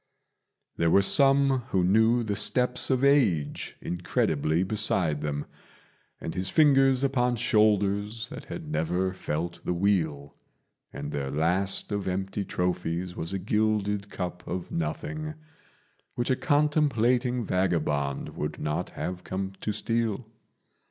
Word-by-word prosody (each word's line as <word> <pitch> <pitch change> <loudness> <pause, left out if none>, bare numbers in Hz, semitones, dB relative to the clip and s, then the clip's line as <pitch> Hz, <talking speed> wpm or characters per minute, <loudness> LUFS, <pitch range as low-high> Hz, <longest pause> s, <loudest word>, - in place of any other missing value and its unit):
There 85 - +2
were 100 +4 +5
some 135 +3 +5
who 95 -5 +1
knew 110 +6 +3
the 105 -2 -2
steps 125 +4 +2
of 130 -1 +1
Age 110 - +2
incredibly 85 -2 0
beside 95 -7 +1
them, 75 -1 -3 0.7
And 80 - -5
his 95 0 -2
fingers 135 -3 +4
upon 125 -3 +1
shoulders 105 0 +1
that - - -9
had - - -7
never 90 +4 0
felt 85 -1 -4
the 90 - -1
wheel; 80 -7 0 0.6
And 70 +1 -6
their 70 -2 -3
last 90 +9 0
of 100 -2 -2
empty 95 +2 -2
trophies 90 -1 -2
was 80 +2 -3
a 100 - -1
gilded 105 0 0
cup 90 -2 -5
of 90 0 -5
nothing, 155 - -4 0.8
Which 120 +2 -1
a - - +3
contemplating 130 -6 +1
vagabond 75 -7 -1
would - - -5
not 75 0 -2
have 90 0 -4
come 95 +1 -4
to 105 - -1
steal. 115 +1 -1
100 Hz, 130 wpm, -27 LUFS, 85-120 Hz, 0.8 s, were